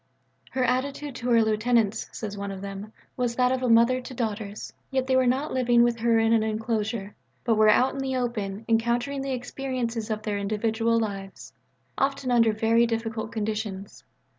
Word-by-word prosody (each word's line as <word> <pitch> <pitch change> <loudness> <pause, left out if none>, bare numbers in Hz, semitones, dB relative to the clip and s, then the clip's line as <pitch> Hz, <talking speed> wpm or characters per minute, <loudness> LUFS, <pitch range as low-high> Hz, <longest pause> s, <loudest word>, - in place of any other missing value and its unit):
"Her 260 - -1
attitude 275 +3 -1
to 245 0 -3
her 230 -1 +5
lieutenants," 220 0 +1
says 210 -2 -6
one 200 0 -5
of 195 -1 -6
them, 200 +2 -7 0.2
"was 245 -2 -1
that 250 0 +3
of 260 0 0
a 250 - 0
mother 235 +3 +5
to 255 - -9
daughters. 215 -3 -4 0.2
Yet 265 -1 0
they 260 0 +1
were 260 -1 +4
not 265 +5 0
living 240 -2 +4
with 240 -1 +1
her 230 0 +3
in 225 0 +3
an 225 - +4
enclosure, 220 -1 -2 0.3
but 230 - +2
were 215 0 +5
out 255 +5 +4
in 275 - -5
the 265 -1 -2
open 220 -4 -3
encountering 240 +4 +1
the 270 0 -2
experiences 245 -3 -3
of 215 -1 -3
their 205 -2 -2
individual 225 +3 0
lives, 195 -3 -5 0.5
often 275 -1 0
under 230 -2 +4
very 225 +2 +3
difficult 225 -1 -3
conditions. 210 -2 -4
230 Hz, 185 wpm, -26 LUFS, 215-250 Hz, 0.5 s, her